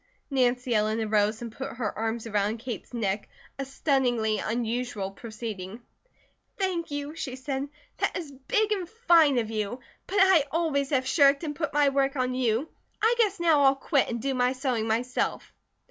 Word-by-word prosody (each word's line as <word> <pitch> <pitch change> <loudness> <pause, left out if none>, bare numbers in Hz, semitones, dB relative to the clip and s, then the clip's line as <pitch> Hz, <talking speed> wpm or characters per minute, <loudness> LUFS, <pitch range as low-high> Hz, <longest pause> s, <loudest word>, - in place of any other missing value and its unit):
Nancy 250 -2 +1
Ellen 215 +1 +1
arose 215 +1 +1
and 230 - -6
put 270 +4 -6
her 230 -4 -3
arms 225 +1 -2
around 210 0 0
Kate's 230 -1 -7
neck, 205 -4 -2 0.3
a 275 - -2
stunningly 245 -6 +1
unusual 230 -3 -2
proceeding. 215 -2 -7 0.8
"Thank 370 -4 -1
you," 290 0 -4
she 275 -5 -5
said. 270 +1 -4 0.3
"That - - 0
is 325 -5 -6
big 425 - 0
and 375 -5 -1
fine 340 - +4
of 225 -2 -1
you. 215 +3 -2 0.3
But 395 - -2
I 380 -6 +6
always 295 -3 0
have 265 -3 +1
shirked 280 +1 +4
and 295 -2 -3
put 305 -1 -2
my 290 -1 +4
work 275 0 +1
on 255 -1 0
you; 250 +2 0 0.3
I 450 +2 +4
guess 410 -4 +2
now 325 -4 +4
I'll 270 0 +5
quit, 275 0 +1
and 235 - -2
do 270 +4 -1
my 250 0 +2
sewing 255 -4 -1
myself." 240 +3 -1
260 Hz, 175 wpm, -27 LUFS, 225-290 Hz, 0.8 s, I